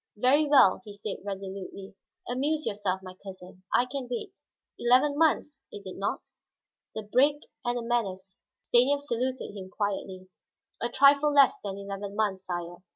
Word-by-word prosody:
"Very 275 +7 +4
well," 265 -10 +5
he 210 -3 -10
said 205 0 -5
resolutely. 195 0 -7 0.3
"Amuse 295 +5 -1
yourself, 200 -2 -2
my 185 -1 -9
cousin; 185 -1 -11
I 245 - +4
can 255 0 -5
wait. 370 - -4 0.5
Eleven 260 +4 +4
months, 300 -2 +1
is 205 - -10
it 185 - -7
not?" 200 +1 -2 0.7
The 220 - -4
break, 275 +7 +2 0.2
and 240 0 -1
the 240 - -3
menace. 195 -5 -2 0.2
Stanief 270 +4 +3
saluted 255 -4 -3
him 190 -2 -8
quietly. 190 -2 -4 0.5
"A 235 - 0
trifle 280 +3 +5
less 280 -1 +6
than 195 -1 -4
eleven 200 0 -6
months, 200 -3 -1
sire. 175 -1 -5
215 Hz, 155 wpm, -28 LUFS, 195-265 Hz, 0.7 s, less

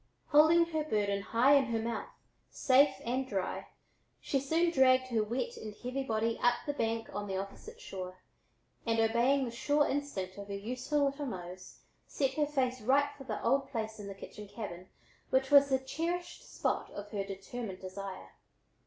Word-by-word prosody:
Holding 315 +3 +6
her 315 -2 -2
burden 205 -8 0
high 235 +7 +4
in 280 -2 +5
her 230 -2 -1
mouth, 225 0 -3 0.4
safe 270 +1 +4
and 255 +3 -1
dry, 195 -3 -2 0.5
she 275 - 0
soon 325 +5 +2
dragged 255 -3 +4
her 225 -3 +2
wet 265 - -3
and 215 -1 -7
heavy 255 +4 -3
body 225 -2 -1
up 245 0 +4
the 290 - -1
bank 225 -4 -2
on 205 - -3
the 190 -1 -2
opposite 315 - -7
shore, 185 - -7 0.7
and 225 -1 +1
obeying 240 +5 +3
the 235 - -4
sure 290 +5 +2
instinct 200 -10 -3
of 200 - -7
her 200 - -4
useful 250 +8 -1
little 280 +1 -2
nose 185 -3 -8 0.3
set 270 -2 0
her 295 +1 +1
face 255 -3 0
right 280 +5 +3
for 270 - -11
the - - -4
old 270 +3 +2
place 220 -3 -4
in 205 - -7
the 195 - -6
kitchen 210 +1 -10
cabin 190 -4 -7 0.4
which 265 +1 +2
was 280 -1 +8
the 265 - +4
cherished 335 +7 -4
spot - - -1
of 205 0 -8
her 200 -2 -1
determined 195 +1 -6
desire. 190 0 -7
245 Hz, 180 wpm, -32 LUFS, 205-280 Hz, 0.7 s, was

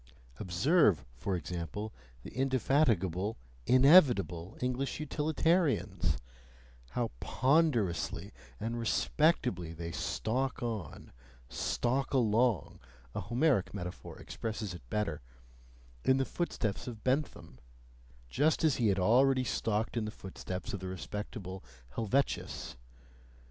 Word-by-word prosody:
Observe, 100 - +3
for 90 +11 -2
example, 90 +5 -4 0.3
the - - -8
indefatigable, 115 - +1 0.3
inevitable 125 - +5
English 125 +3 -2
utilitarians: 150 - +1 0.8
how - - -1
ponderously 130 - +1 0.3
and 115 +2 -3
respectably 115 - +1
they 85 0 -5
stalk 125 +9 -2
on, 110 - -5 0.4
stalk 135 +3 -1
along 115 - +2 0.3
(a - - -2
Homeric 120 - +1
metaphor 90 -2 -6
expresses 110 -4 -5
it 90 - -9
better) 100 -6 -1 0.8
in 130 - +4
the 135 - +1
footsteps 120 - -2
of 115 -4 -7
Bentham, 130 - -1 0.7
just 150 - +2
as 155 -4 +3
he 115 - +2
had 100 -2 +2
already 130 +7 +4
stalked 110 -1 -1
in 115 -2 0
the - - -3
footsteps 95 -2 -6
of 100 - -3
the 95 - -6
respectable 95 +1 -6 0.3
Helvetius! 115 - -1
110 Hz, 105 wpm, -32 LUFS, 95-135 Hz, 0.8 s, inevitable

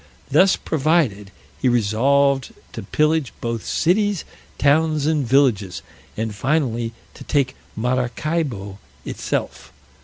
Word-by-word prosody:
Thus 185 +7 +5
provided, 140 - 0 0.3
he 130 - +3
resolved 130 +4 +2 0.2
to - - -5
pillage 155 -2 +1
both 115 -1 -3
cities, 200 +2 +1 0.3
towns, 155 +1 +2
and 150 -4 +1
villages, 115 -8 +2 0.3
and 110 0 -2
finally, 120 -2 -1 0.2
to - - -11
take 135 -3 0 0.2
Maracaibo 125 -3 -2 0.3
itself. - - -4
135 Hz, 100 wpm, -21 LUFS, 115-155 Hz, 0.3 s, Thus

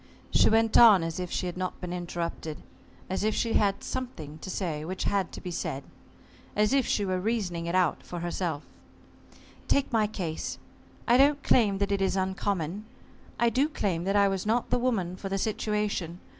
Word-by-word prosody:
She - - +5
went 225 0 +4
on 215 -7 +8
as 165 +1 -3
if 180 -1 -3
she - - -2
had 175 - -4
not 185 0 -3
been 180 -1 -5
interrupted, 170 -3 -4 0.4
as 190 +2 -2
if 215 0 +1
she 230 - 0
had 200 -2 +2
something 165 - -5
to 190 - -8
say 165 -5 -3
which 185 +4 -4
had 195 -3 0
to - - -6
be 180 - -5
said, 140 -4 -3 0.7
as 210 +4 +2
if 275 -2 +3
she 205 - +1
were 185 -1 0
reasoning 185 -5 -2
it 170 - -1
out 185 -1 +2
for 175 -1 -7
herself: 170 -3 -2 1.0
"Take 275 -2 +1
my 220 -2 +3
case. 175 -7 -4 0.5
I 240 +1 +6
don't 280 +1 +4
claim 210 -5 +3
that 200 0 -1
it 200 -1 +1
is 190 0 +1
uncommon. 190 0 -2 0.5
I 235 0 +3
do 275 +5 +2
claim 185 - -1
that 195 +1 0
I 200 -1 +5
was 195 -1 -1
not 230 +3 0
the - - +3
woman 195 -8 -1
for 195 - -5
the 195 - -1
situation. 210 -4 -2
195 Hz, 195 wpm, -28 LUFS, 175-215 Hz, 1.0 s, on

